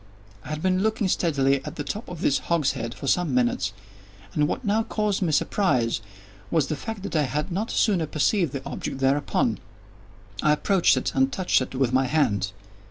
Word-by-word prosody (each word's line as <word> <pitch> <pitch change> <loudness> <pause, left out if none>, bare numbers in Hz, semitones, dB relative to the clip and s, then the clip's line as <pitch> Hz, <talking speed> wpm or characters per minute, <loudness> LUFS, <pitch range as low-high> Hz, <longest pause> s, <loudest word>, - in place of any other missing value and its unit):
I - - -10
had 155 0 -4
been 185 0 +2
looking 220 -1 +1
steadily 140 -7 +1
at - - -7
the 145 - -4
top 210 +9 -5
of 175 -3 -7
this 140 - +2
hogshead 140 -8 0
for - - -8
some 155 0 +1
minutes, 120 -5 +1 0.6
and 150 -1 +2
what 260 - -3
now 210 +2 +2
caused 210 -3 -1
me 175 -4 +1
surprise 125 - +1 0.5
was 160 -4 +2
the 155 - 0
fact 210 +6 -6
that 200 - -4
I 155 - +4
had 150 +6 -2
not 205 +6 -2
sooner 185 -8 +2
perceived 165 +2 +1
the 140 -2 -6
object - - -4
thereupon. 135 +2 +1 0.8
I 150 - +4
approached 185 +3 +3
it, - - -1
and 135 0 +2
touched 180 -3 +2
it 130 - -5
with 130 -1 +1
my 130 +1 +3
hand. 105 -9 +1
150 Hz, 190 wpm, -25 LUFS, 135-190 Hz, 0.8 s, I